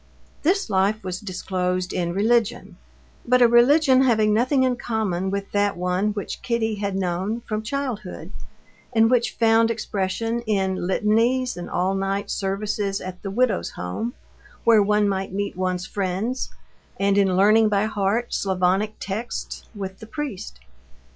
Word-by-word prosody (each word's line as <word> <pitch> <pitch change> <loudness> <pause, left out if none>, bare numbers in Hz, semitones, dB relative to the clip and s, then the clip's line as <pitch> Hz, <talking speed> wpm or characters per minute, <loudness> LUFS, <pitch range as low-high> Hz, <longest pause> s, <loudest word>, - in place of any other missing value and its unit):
This 380 +6 +1
life 200 +2 +1
was 185 -1 -4
disclosed 185 -2 -2
in 175 -2 -1
religion, 225 +4 0 0.5
but 250 +1 +3
a 240 - +7
religion 260 +3 +5
having 220 -5 +3
nothing 255 +4 +2
in 255 -1 +2
common 205 -6 -2
with 200 0 -4
that 205 -1 +1
one 180 +3 0
which 205 -1 -5
Kitty 230 -2 0
had 200 -2 -3
known 190 +4 -2
from 215 -2 -3
childhood, 225 -5 -4 0.6
and 225 +1 +4
which 245 -2 +2
found 225 0 +4
expression 225 +1 -2
in 190 -3 0
litanies 230 +6 +1
and 175 - -7
all 185 +2 0
night 195 +1 -2
services 200 0 -2
at 185 -1 -8
the 195 - -5
Widow's 225 -1 +1
Home, 220 - -5 0.5
where 225 -2 +6
one 210 0 +2
might 195 -1 -2
meet 200 +1 -2
one's 185 -1 -2
friends, 200 +6 -2 0.5
and 200 0 +2
in 195 -2 +3
learning 215 +3 +5
by 205 0 +2
heart 215 +2 -1
Slavonic 190 +2 +1
texts 215 +5 -5
with 190 -2 -6
the 220 - -10
priest. 220 - -6
205 Hz, 145 wpm, -23 LUFS, 190-230 Hz, 0.6 s, a